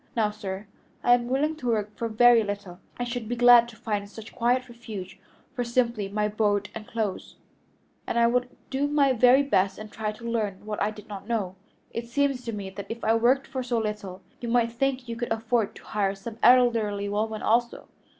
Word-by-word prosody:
Now, 215 -3 +2
sir, 200 -1 -6 0.4
I 245 - +6
am 240 -1 +2
willing 290 +5 0
to 250 - -5
work 210 -2 -1
for 230 - -2
very 235 +1 +6
little; 200 -3 -6 0.2
I 245 - -2
should 240 -2 -4
be 245 - -1
glad 240 -1 +7
to 230 - -13
find 210 -3 -3
such 225 +1 -11
a - - -24
quiet 250 +2 +1
refuge 210 -6 -9 0.3
for 250 -2 -2
simply 235 -4 0
my 210 +1 0
board 205 -1 0
and 220 0 -8
clothes, 220 -5 -3 0.7
and - - -1
I 235 - +5
would 250 +1 +1 0.2
do 280 +2 +1
my 285 -2 +3
very 255 +3 +5
best 195 -8 +1
and 215 -1 -9
try 215 -1 -3
to 225 - -15
learn 210 -4 -2
what 210 -1 -4
I 205 - +2
did 210 -1 -11
not 200 -2 -8
know. 205 -6 -2 0.4
It 235 0 -5
seems 275 +1 0
to 230 - -2
me 200 -3 -6
that 200 +1 -8
if 230 +1 -6
I 220 - +3
worked 245 +4 +3
for 260 - -4
so 245 -1 -1
little 210 -4 -4 0.2
you 240 - -5
might 230 -1 +2
think 255 +1 -1
you 230 - -4
could 240 0 -4
afford 225 -1 0
to - - -13
hire 200 -2 -1
some 220 +3 -9
elderly 230 -5 +4
woman 215 +1 -2
also?" 235 +2 +1
230 Hz, 215 wpm, -26 LUFS, 210-245 Hz, 0.7 s, glad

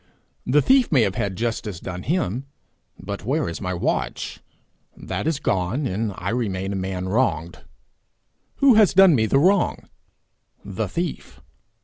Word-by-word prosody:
The 145 +4 +4
thief 260 -2 +4
may 130 -7 +5
have 100 -3 0
had 95 0 -2
justice 110 -4 -3
done 90 -1 -6
him 135 - -2 0.5
but 100 +1 -6
where 145 +8 0
is 85 -2 -5
my 90 0 -2
watch? 85 - -2 0.6
That - - -4
is 160 -3 +1
gone, 105 +5 -1
and 110 -1 -2
I 95 +3 -3
remain 100 -5 -2
a - - -3
man 95 -1 -3
wronged. 95 -6 0 1.0
Who 275 -2 +5
has 215 -4 +4
done 190 -2 +7
me 110 -5 +2
the 135 - +2
wrong? 185 +6 +2 0.8
The 100 +2 -3
thief. 170 - -5
110 Hz, 150 wpm, -23 LUFS, 95-150 Hz, 1.0 s, done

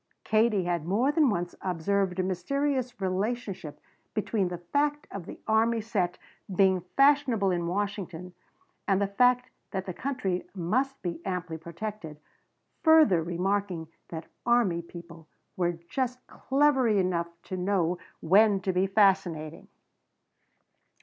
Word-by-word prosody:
Katie 215 -2 +2
had 175 -2 -1
more 230 +10 +2
than 300 -3 +4
once 175 -4 -2
observed 185 +1 0
a 185 - +1
mysterious 250 +7 -1
relationship 195 -3 -3 0.4
between 215 -2 0
the 175 0 -4
fact 290 +12 -1
of 190 -4 -7
the - - -9
army 225 +1 +3
set 205 -5 -1 0.3
being 190 -1 +3 0.2
fashionable 275 -8 +4
in 175 -1 -1
Washington 180 -2 -3 0.5
and 195 -1 +3
the 200 - +2
fact 250 +5 +2 0.2
that 190 -2 -3
the 185 - -4
country 215 -7 -2
must 255 +10 0
be 170 -1 -4
amply 180 -4 -4
protected, 170 -1 -7 0.6
further 315 - +6
remarking 180 0 -2 0.2
that 160 -1 -6 0.2
army 235 -8 +2
people 170 -1 -12 0.3
were 175 -1 +1
just 255 +1 -2
clever 270 -2 +2
enough 185 -5 +1 0.2
to 185 - -5
know 180 -2 0 0.2
when 200 +4 +5
to 190 0 -1
be 185 +2 +2
fascinating. 190 -6 +1
195 Hz, 130 wpm, -28 LUFS, 175-230 Hz, 0.6 s, further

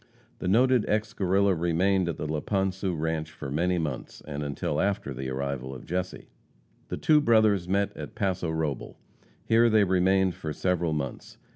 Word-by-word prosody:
The - - -3
noted 125 +4 +4
ex 110 +1 0
Guerrilla 100 0 +2
remained 90 +2 +1
at 85 - -3
the - - -4
Laponsu 95 +3 -1
ranche 80 0 -2
for 70 -3 -8
many 90 +5 +1
months, 75 -6 -4
and 75 -1 -4
until 75 +1 -2
after 95 -8 -1
the 65 +1 -5
arrival 65 0 -3
of 65 - -10
Jesse. 90 +1 -4 0.6
The - - -4
two 150 -1 +4
brothers 110 -8 +3
met 100 +1 0
at - - -8
Paso 95 -5 -1
Robel. 80 -5 -3 0.5
Here 115 +1 +4
they 110 -2 +5
remained 95 0 +3
for 80 -2 -5
several 85 0 0
months. 70 -4 -5
90 Hz, 165 wpm, -27 LUFS, 75-100 Hz, 0.6 s, they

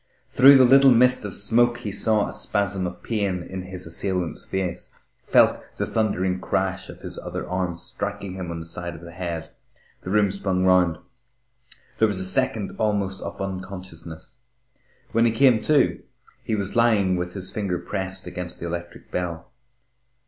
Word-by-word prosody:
Through 135 +2 +8
the 130 - +7
little 135 +2 +7
mist 125 -1 +4
of 100 - -5
smoke 120 +3 +2
he 110 -4 -5
saw 105 +1 +2
a - - -6
spasm 95 -2 -1
of 90 0 -9
pain 100 -6 -1
in 95 +1 -6
his 90 0 -7
assailant's 90 +1 -3
face, 90 -2 -3 0.3
felt - - +4 0.2
the - - 0
thundering 95 -4 0
crash - - -1
of - - -11
his - - -7
other - - -5
arm, 90 -1 -2
striking 100 +2 -4
him 95 -2 -5
on 85 0 -4
the 80 - -7
side 85 +1 -6
of - - -11
the 85 0 -10
head. 85 -2 -5 0.5
The - - -7
room 100 0 +3
spun 95 -1 -1
round. 90 -3 +4 1.0
There 110 - +5
was 100 -3 -1
a 95 - 0
second 110 0 0
almost 100 -3 0
of - - -6
unconsciousness.... 95 0 -7 0.7
When 115 +1 +3
he - - +2
came 115 -1 +4
to, 150 -2 +3 0.4
he 110 - -1
was 100 0 -3
lying 110 -6 +3
with 90 +1 -4
his 95 -1 -4
finger 100 -4 -2
pressed 95 0 -5
against 90 0 -6
the - - -5
electric 85 0 -6
bell. 85 -2 -4
95 Hz, 170 wpm, -24 LUFS, 90-105 Hz, 1.0 s, Through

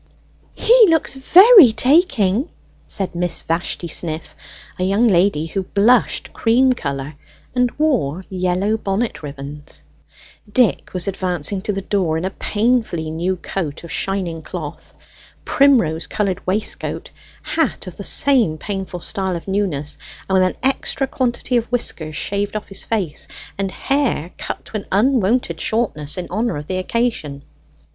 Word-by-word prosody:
"He 470 0 +6
looks 320 -4 +2
very 365 - +8
taking!" 265 - +2 0.4
said 195 -4 -2
Miss 175 0 -2
Vashti 170 +1 -2
Sniff, 160 0 -3 0.4
a - - 0
young 200 +6 +3
lady 175 -5 +2
who 190 +4 -3
blushed 210 +6 +2
cream 255 +3 +3
colour 140 - -4 0.4
and 250 0 +2
wore 195 - 0
yellow 185 +3 0
bonnet 215 +3 -2
ribbons. 145 0 -9 0.7
Dick 235 -3 +2
was 180 0 0
advancing 185 -1 -2
to 210 - -2
the 195 -1 -4
door 185 -6 0
in 165 - -3
a 190 - -2
painfully 210 -8 0
new 175 +4 -1
coat 170 -4 -5
of 170 - -9
shining 180 -4 -2
cloth, 155 -3 -8 0.5
primrose 255 - +3
coloured 195 -3 -2
waistcoat, 205 +4 -2 0.3
hat 320 -10 -1
of 180 -3 -9
the 200 - -6
same 235 - +3
painful 190 -1 -5
style 190 0 -2
of 170 - -7
newness, 185 -8 -2 0.3
and 190 - -2
with 190 -1 +5
an - - -5
extra 270 +1 0
quantity 250 -1 -1
of 235 +1 -2
whiskers 160 -10 -2
shaved 200 +4 -2
off 210 - -5
his 195 -1 -4
face, 190 -9 -2 0.3
and 195 0 -2
hair 255 - -1
cut - - -5
to 215 - -5
an 200 - -8
unwonted 215 -5 +1
shortness 190 -11 -1
in 180 - -3
honour 220 0 -1
of 150 - -6
the 185 +3 -2
occasion. 185 - -2
195 Hz, 145 wpm, -19 LUFS, 170-240 Hz, 0.7 s, very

